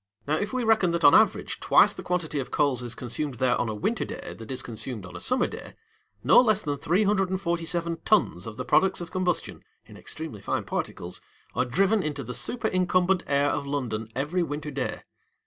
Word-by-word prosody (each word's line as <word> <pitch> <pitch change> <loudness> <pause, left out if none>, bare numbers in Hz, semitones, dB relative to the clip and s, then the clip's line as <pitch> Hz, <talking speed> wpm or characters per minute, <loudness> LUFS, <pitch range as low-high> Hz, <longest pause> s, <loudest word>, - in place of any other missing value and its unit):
Now, 150 +2 +1
if 205 +5 -2
we 255 -1 -1
reckon 220 -5 +3
that 170 -1 -1
on 145 - +8
an - - +9
average - - -2
twice - - +5
the - - -8
quantity 170 -5 -2
of 130 - -4
coals 135 -4 +2
is 120 -1 -4
consumed 130 +3 -3
there 125 +1 +2
on 120 - -1
a 110 - -3
winter 105 - -1
day - - -7
that 115 -1 -11
is 130 -1 -2
consumed 115 -2 -5
on 90 -1 -11
a - - -6
summer 255 0 +1
day, - - -8 0.5
no - - +7
less 215 -4 +2
than 145 -1 -2
347 175 -2 0
tons 145 - +2
of 110 - -8
the - - -4
products 190 0 +3
of 170 -2 -7
combustion 185 -2 -2 0.2
(in - - -14
extremely 155 -11 -6
fine - - -2
particles) - - -4 0.3
are - - +1
driven 195 - +2
into 150 -3 -3
the 125 - -6
superincumbent 185 - +1
air 140 +1 +2
of 140 - -3
London 115 -6 -3
every 150 +7 -1
winter 150 -1 -3
day. 135 -2 -3
155 Hz, 200 wpm, -26 LUFS, 130-185 Hz, 0.5 s, an